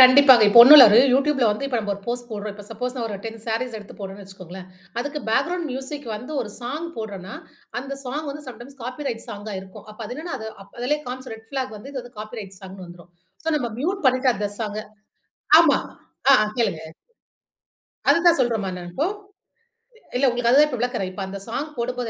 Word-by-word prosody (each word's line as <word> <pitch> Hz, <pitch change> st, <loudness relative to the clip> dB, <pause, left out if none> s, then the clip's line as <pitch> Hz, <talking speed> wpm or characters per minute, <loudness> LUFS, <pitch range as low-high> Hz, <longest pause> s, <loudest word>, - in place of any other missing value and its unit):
கண்டிப்பாங்க. 255 Hz, -2 st, +8 dB
இப்ப 235 Hz, -, +6 dB
1 285 Hz, +5 st, +10 dB
இல்ல 260 Hz, -, +12 dB
ஒரு 215 Hz, -, +6 dB, 0.2 s
YouTube 280 Hz, +1 st, +2 dB
ல -, -, +5 dB
வந்து 210 Hz, +7 st, -3 dB
இப்ப 255 Hz, -3 st, -1 dB
நம்ம 205 Hz, -2 st, -2 dB
ஒரு 200 Hz, -, -12 dB
போஸ்ட் 240 Hz, 0 st, -3 dB
போட்றோம். 210 Hz, -1 st, -5 dB
இப்ப 205 Hz, -1 st, -11 dB
சப்போஸ் 250 Hz, +4 st, -4 dB
ஒரு 210 Hz, -, -5 dB
10 225 Hz, 0 st, -6 dB
சாரீஸ் 230 Hz, +1 st, -2 dB
எடுத்து 205 Hz, -, -13 dB
போட்றேன்னு 195 Hz, 0 st, -8 dB
வச்சுகோங்களேன்! 185 Hz, -1 st, -11 dB, 0.3 s
அதுக்கு 290 Hz, +4 st, -3 dB
பேக்கிரவுண்ட் 345 Hz, +8 st, 0 dB
மியூசிக் 270 Hz, +1 st, -6 dB
வந்து 250 Hz, +8 st, -9 dB
ஒரு 215 Hz, -, -5 dB
சாங் 295 Hz, +8 st, -4 dB
போட்றன்னா, 200 Hz, -4 st, -7 dB, 0.4 s
அந்த 275 Hz, +2 st, -6 dB
சாங் 290 Hz, +5 st, -4 dB
வந்து 295 Hz, +2 st, -8 dB
சம்டைம்ஸ் 260 Hz, +3 st, -11 dB
காப்பிரைட் 250 Hz, -1 st, -5 dB
சாங்கா 210 Hz, -1 st, -7 dB
இருக்கும். 190 Hz, +1 st, -13 dB
அப்ப 215 Hz, -, -14 dB
அது 245 Hz, -, -7 dB
என்னன்னா, 335 Hz, +2 st, -5 dB
அது 220 Hz, 0 st, -6 dB, 0.3 s
அதிலேயே 295 Hz, +5 st, 0 dB
காண்பிச்சிரும். 255 Hz, -2 st, -6 dB
ரெட் 225 Hz, 0 st, -19 dB
ஃபிளாக் 260 Hz, -5 st, -3 dB
வந்து, 265 Hz, +7 st, -10 dB
இந்த 260 Hz, -3 st, -5 dB
இது 245 Hz, -, -12 dB
காப்பிரைட் 215 Hz, -3 st, -8 dB
சாங்ன்னு 190 Hz, -1 st, -10 dB
வந்திரும். 175 Hz, 0 st, -14 dB, 0.3 s
சோ, 325 Hz, -, -2 dB
நம்ம 240 Hz, -5 st, -2 dB
மியூட் 370 Hz, +3 st, -2 dB
பண்ணிட்டு 255 Hz, 0 st, +3 dB
அந்த 205 Hz, 0 st, -2 dB
சாங்க 215 Hz, -2 st, -3 dB, 0.8 s
ஆமா! -, -, +5 dB, 0.5 s
ஆ, -, -, +9 dB
ஆ -, -, 0 dB
கேளுங்க. 200 Hz, -9 st, 0 dB, 1.3 s
அதுதான் 340 Hz, 0 st, +5 dB
சொல்றேன்ம்மா! 220 Hz, -6 st, 0 dB
நான் 175 Hz, 0 st, -8 dB
இப்போ. 295 Hz, -, 0 dB, 1.1 s
இல்ல. 270 Hz, -, +2 dB
உங்களுக்கு 240 Hz, -1 st, 0 dB
அதுதான் 295 Hz, +3 st, +6 dB
இப்ப 250 Hz, -, -4 dB
விளக்குறேன். 240 Hz, -6 st, -2 dB
இப்ப 190 Hz, +2 st, -7 dB
அந்த 200 Hz, +1 st, -7 dB
சாங் 270 Hz, +6 st, -3 dB
போடும்போது 245 Hz, 0 st, -3 dB
240 Hz, 195 wpm, -23 LUFS, 210-270 Hz, 1.3 s, இல்ல